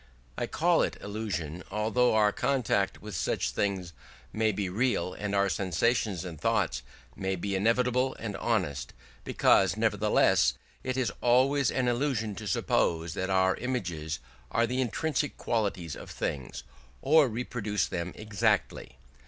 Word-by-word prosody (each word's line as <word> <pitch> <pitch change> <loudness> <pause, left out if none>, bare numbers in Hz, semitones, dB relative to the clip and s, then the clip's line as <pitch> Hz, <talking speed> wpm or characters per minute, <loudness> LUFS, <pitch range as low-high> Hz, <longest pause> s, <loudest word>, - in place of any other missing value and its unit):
I - - -2
call - - +2
it - - -1
illusion, 100 -6 -4
although 110 +3 +2
our 105 -1 +4
contact 125 -8 0
with 105 -3 -6
things 90 +1 -1 0.4
may 110 0 +2
be 100 -1 -2
real, 105 -1 0
and 105 -1 -3
our 100 0 +3
sensations 95 0 0
and 85 -4 -8
thoughts - - +1 0.3
may 95 0 -2
be 100 +2 -3
inevitable 125 +6 +2
and 110 -3 -5
honest; 90 - -1 0.3
because - - +3
nevertheless - - +3 0.3
it 130 0 -2
is 130 -2 +1
always 130 +3 +3
an 125 -2 0
illusion 120 -4 0
to 110 - -6
suppose 85 -3 +1
that 95 +2 -3
our 95 0 +3
images 85 -11 -3 0.3
are 115 - +2
the 125 +3 -1
intrinsic 145 +3 -1
qualities 100 - -1
of - - -10
things, 70 -3 -4 0.4
or 155 0 +6
reproduce 110 -5 -2
them 85 +1 -4
exactly. 105 -2 -1
105 Hz, 135 wpm, -29 LUFS, 95-125 Hz, 0.4 s, or